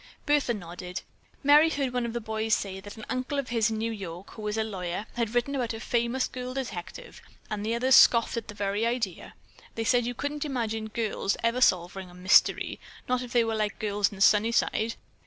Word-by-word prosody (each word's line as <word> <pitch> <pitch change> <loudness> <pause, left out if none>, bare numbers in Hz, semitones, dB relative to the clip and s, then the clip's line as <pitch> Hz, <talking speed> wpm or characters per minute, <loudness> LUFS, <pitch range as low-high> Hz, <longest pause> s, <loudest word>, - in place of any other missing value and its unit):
Bertha 290 -5 +2
nodded. 180 -1 -7 0.4
"Merry 295 +3 +7
heard 275 -5 -2
one 245 -1 0
of 230 - -5
the 240 - -2
boys 220 -1 0
say 190 -1 -4
that 205 +2 -11
an 220 - -8
uncle 255 +3 -2
of 275 -2 -2
his 230 -1 +2
in 220 - -2
New 225 +1 -1
York, 190 -3 -7
who 215 -1 -6
is 210 +1 -2
a 220 - +2
lawyer, 190 -2 -4
had 235 -1 -2
written 245 +4 +1
about 245 -4 -1
a - - -6
famous 235 +2 0
girl 255 0 -6
detective, 200 -9 -6 0.3
and 210 -1 -2
the 225 +2 0
others 255 +3 +2
scoffed 235 -2 +6
at 230 -2 -4
the 210 - -9
very 205 +1 -1
idea. 230 -6 -2 0.4
They 225 - -2
said 245 0 +3
they 245 - -2
couldn't 290 +4 -3
imagine 225 -6 -2
girls 215 -3 -1
ever 230 +2 +1
solving 185 -2 +2
a 175 - -15
mystery, 185 +1 +3 0.3
not 250 0 +1
if 250 -1 -7
they 240 -2 +4
were 225 - -1
all 220 - -2
like 210 -1 -1
girls 205 -1 0
in 200 - -10
Sunnyside. 220 +1 +3
225 Hz, 215 wpm, -28 LUFS, 205-245 Hz, 0.4 s, Merry